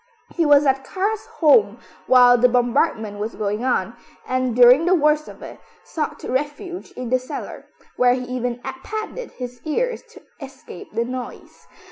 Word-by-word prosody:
He 335 -3 +1
was 290 0 +5
at 270 0 +1
Karl's 400 +8 -3
home 230 - +3 0.3
while 245 -1 +7
the 245 +1 +4
bombardment 240 -4 0
was 215 +2 -4
going 210 +2 -3
on, 240 -4 -1 0.3
and, 255 -2 -1
during 250 +5 +6
the 365 +1 +4
worst 300 -1 +2
of - - -12
it, - - -10 0.2
sought 310 - -5
refuge 295 +7 -4
in 250 -2 -6
the 255 +1 +2
cellar, 255 - -8 0.3
where 250 0 +4
he 255 - -4
even 245 -1 -4 0.2
padded 435 +3 -6
his 245 -1 -8
ears 485 +11 -2
to - - -15 0.2
escape 265 -9 -11
the 230 +2 -1
noise. 255 0 -8
255 Hz, 160 wpm, -21 LUFS, 245-300 Hz, 0.3 s, while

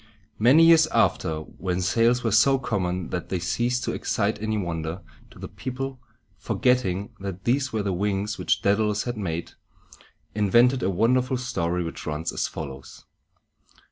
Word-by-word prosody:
Many 135 +9 +6
years 165 -1 +6
after, 85 - +1
when 90 +3 -4
sails 115 +7 +2
were 115 - 0
so 135 +6 +5
common 90 -8 -2
that 90 -2 -4
they 95 - -1
ceased 120 +8 -1
to - - -1
excite 105 0 -1
any 110 0 -1
wonder, 85 -2 -4 0.3
the - - -8
people, 130 +1 -6 0.4
forgetting 115 -5 0
that 95 -1 -6
these 130 +2 +1
were 110 -2 -1
the 100 -2 -1
wings 100 +3 -2
which - - 0
Dædalus 105 +1 +1
had 120 0 -4
made, 85 -5 -4 0.8
invented 120 +5 +3
a 95 - +1
wonderful 125 +6 +1
story, 90 -8 -2
which 80 - -7
runs 75 +2 -3
as - - -1
follows. 70 -3 -9
105 Hz, 150 wpm, -25 LUFS, 90-125 Hz, 0.8 s, Many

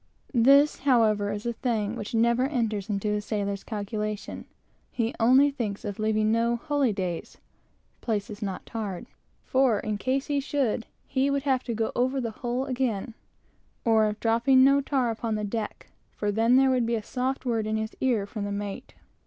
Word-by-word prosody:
This, 275 +5 +5
however, 220 -6 +3
is 205 +1 -5
a 235 - -1
thing 225 -3 -1
which 230 +1 -5
never 235 +2 +3
enters 220 -8 -2
into 210 0 -1
a 210 - -1
sailor's 200 -2 -3
calculation. 210 -1 -4 0.5
He 230 -1 -1
thinks - - -14
only 260 +5 +6 0.3
of 205 -1 -5
leaving 215 0 +1
no 230 +1 +2
holydays, 225 - -1 0.6
(places 210 -1 -3
not 195 -3 -4
tarred,) 205 -6 -5 0.4
for 260 -5 +2
in 210 -1 -3
case 265 +3 0
he 285 -1 0
should, 270 -5 -1 0.2
he 270 +1 +1
would 280 -1 0
have 265 -3 +1
to 235 - -2
go 225 0 -1
over 260 +2 +1
the 235 -3 -2
whole 245 +3 -3
again; 250 -4 -2 0.7
or 220 -2 +4
of 210 0 -4
dropping 235 +3 +4
no 275 +1 +5
tar 265 -4 0
upon 225 0 -2
deck, 215 +1 -5 0.2
for 210 -1 -1
then 225 +4 +3
there 265 0 +5
would 250 -3 +1
be 235 - +1
a 220 - -3
soft 260 +4 -2
word 225 -3 0
in 215 0 0
his 220 0 -4
ear 240 -6 +1
from 205 0 -5
the 205 - -3
mate. 205 +4 -5
230 Hz, 180 wpm, -27 LUFS, 210-260 Hz, 0.7 s, only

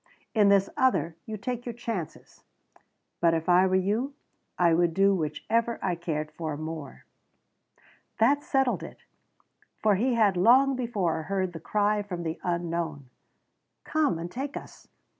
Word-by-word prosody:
In 210 -3 +4
this 195 -1 +4
other, 255 -10 +1
you 220 -1 -4
take 245 +4 -4
your 240 - -5
chances. 225 -9 -6 0.8
But 165 -1 +3
if 165 0 -3
I 180 +1 +5
were 185 - +1
you, 215 +9 0 0.4
I 170 -2 +4
would 170 0 +2
do 195 +1 +4
whichever 210 +8 -1
I - - -1
cared 155 -3 -3
for 155 -1 -4
more." 155 - -7 1.1
That 275 +6 +3
settled 270 -3 +1
it, - - -10 0.7
for 215 -1 +3
he 245 +4 +1
had 210 -4 +3
long 260 +8 +5
before 205 -10 -1
heard 185 +1 -2
the 165 - -7
cry 210 +4 +1
from 180 -4 -5
the 160 -1 -4
unknown: 170 -6 -3 0.7
"Come 310 - +1
out - - -6
and 175 +1 -6
take 275 +5 -4
us! - - -12
190 Hz, 155 wpm, -27 LUFS, 165-230 Hz, 1.1 s, I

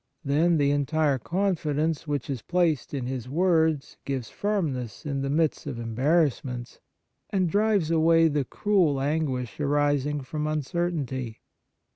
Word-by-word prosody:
Then 160 +5 +3
the 140 -1 +3
entire 145 -1 +1
confidence 160 - -1
which 145 -3 -2
is 135 -5 -3
placed 170 -6 0
in 135 -4 -3
his 125 -1 -4
words 160 -2 +1
gives 135 -4 -3
firmness 155 - -2
in 140 -2 -2
the 135 - -2
midst 155 +1 0
of 135 -5 -4
embarrassments, 125 +1 0 0.5
and 190 -3 +1
drives 205 -2 +2
away 165 0 +5
the 145 -2 0
cruel 175 - +1
anguish 135 -5 -2
arising 145 0 +1
from 150 +3 -3
un 155 -1 -1
certainty. 135 -7 -3
150 Hz, 135 wpm, -26 LUFS, 135-165 Hz, 0.5 s, away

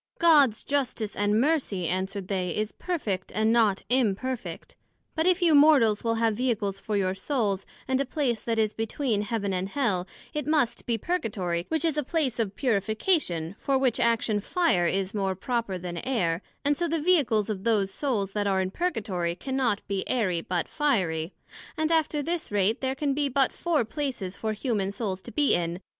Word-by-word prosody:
God's 290 -9 +5
Justice 250 -7 -1
and 205 +1 +2
Mercy, 255 - +1
answered 190 +2 -2
they, 185 -2 -2
is 215 0 -1
perfect, 215 - -3
and 220 +1 +3
not 220 -5 +3
imperfect; 250 +1 -1 0.4
but 320 +1 +1
if 365 0 +3
you 335 -2 +5
Mortals 285 -8 +5
will 230 -1 +1
have 225 -1 +2
Vehicles 210 -5 -1
for 210 +1 -2
your 185 -2 +1
Souls, 200 -3 -1 0.2
and 260 0 +1
a - - 0
place 250 -4 -1
that 230 -1 -2
is 215 -1 +1
between 225 0 -1
Heaven 205 -2 -2
and 185 +1 -2
Hell, 200 -9 0 0.3
it 300 0 -3
must 300 -6 +1
be 235 -1 +1
Purgatory, 200 - -2
which 320 0 0
is 315 -2 0
a 300 - +1
place 270 -5 -1
of 205 -3 -1
Purification, 215 - 0
for 275 -1 +1
which 260 -3 +1
action 230 -2 +2
Fire 205 - +1
is 195 +3 -1
more 195 -2 -1
proper 230 -1 -2
then 175 -1 -6
Air; 175 -7 0 0.2
and 290 +1 +3
so 345 +3 -1
the 330 0 0
Vehicles 290 - +3
of 195 -3 -4
those 210 -4 +1
Souls 215 -9 -1
that 205 0 -1
are 190 -1 +2
in 185 0 -1
Purgatory, 200 - -1
cannot 255 0 -1
be 195 -1 -1
airy, 190 -9 +1
but 175 0 -2
fiery; 185 - 0 0.5
and 315 +1 0
after 315 -2 +1
this 335 -3 -3
rate 205 +2 +1
there 265 0 -1
can 280 0 0
be 285 0 0
but 270 0 +2
four 325 -8 0
places 240 -8 -4
for 220 -1 -2
human 215 -4 -1
Souls 200 -3 -3
to 235 - -10
be 290 +1 +2
in, 170 -1 0
viz. 185 - -10
225 Hz, 190 wpm, -27 LUFS, 195-280 Hz, 0.5 s, God's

